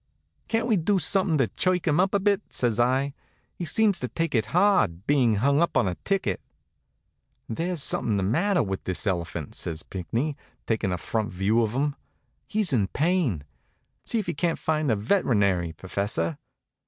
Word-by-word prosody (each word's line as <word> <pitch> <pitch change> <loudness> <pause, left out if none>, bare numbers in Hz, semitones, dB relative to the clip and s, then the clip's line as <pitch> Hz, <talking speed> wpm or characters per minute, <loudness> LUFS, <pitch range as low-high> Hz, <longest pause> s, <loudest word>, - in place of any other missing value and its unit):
"Can't 225 0 0
we 225 -4 +2
do 195 +4 +2
something 190 -3 +1
to 135 -4 +2
chirk 185 -2 0
him 155 +1 +3
up 195 +2 +2
a - - +4
bit?" 200 0 +2
says 120 -3 0
I. 130 +3 +2 0.4
"He 175 - -5
seems 205 +4 +2
to 125 - -2
take 165 +5 -2
it 115 -3 +1
hard, 170 - +2
being 130 -6 +3
hung 140 +8 +2
up 170 - +1
on - - +3
a 90 - 0
ticket." 110 - -1 1.1
"There's 165 +6 -2
something 110 -3 +1
the 95 - 0
matter 170 - +2
with 95 -2 -4
this 95 +2 -2
elephant," 85 -5 -2
says 80 -1 -4
Pinckney, 115 - -3 0.3
taking 110 -4 0
a 90 - -1
front 110 +4 -2
view 100 +6 +2
of 110 -1 0
him. 140 +2 0 0.5
"He's 210 -7 0
in 105 -6 +2
pain. 150 - 0 0.6
See 235 - -1
if 215 - -2
you - - -1
can't 165 +3 0
find 155 -2 0
a 110 - +3
veterinary, 100 - +1
professor." 95 -2 -2
130 Hz, 180 wpm, -26 LUFS, -, 1.1 s, a